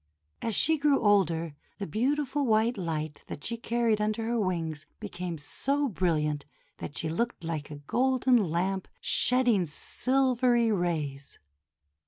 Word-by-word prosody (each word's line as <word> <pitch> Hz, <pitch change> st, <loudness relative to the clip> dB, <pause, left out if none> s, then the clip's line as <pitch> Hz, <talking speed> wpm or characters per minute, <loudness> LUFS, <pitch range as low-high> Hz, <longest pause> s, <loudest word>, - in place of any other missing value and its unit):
As 225 Hz, -3 st, -1 dB
she 320 Hz, -1 st, +3 dB
grew 285 Hz, -1 st, +3 dB
older, 170 Hz, -7 st, +2 dB, 0.2 s
the 200 Hz, -, -4 dB
beautiful 275 Hz, -, 0 dB
white 225 Hz, +2 st, +3 dB
light 155 Hz, -5 st, -4 dB
that 145 Hz, -, -7 dB
she 235 Hz, -, -2 dB
carried 230 Hz, -2 st, 0 dB
under 215 Hz, +1 st, -1 dB
her 235 Hz, +1 st, 0 dB
wings 165 Hz, -6 st, -2 dB
became 175 Hz, -2 st, -5 dB
so 275 Hz, -, -1 dB
brilliant 150 Hz, -7 st, 0 dB, 0.3 s
that 145 Hz, -, -7 dB
she 160 Hz, -, 0 dB
looked 205 Hz, +5 st, -2 dB
like 160 Hz, -3 st, -4 dB
a 150 Hz, -, -7 dB
golden 250 Hz, -, +2 dB
lamp 185 Hz, +3 st, -1 dB
shedding 240 Hz, -8 st, +3 dB
silvery 250 Hz, -, +2 dB
rays. 155 Hz, -8 st, -2 dB
205 Hz, 135 wpm, -28 LUFS, 165-245 Hz, 0.3 s, she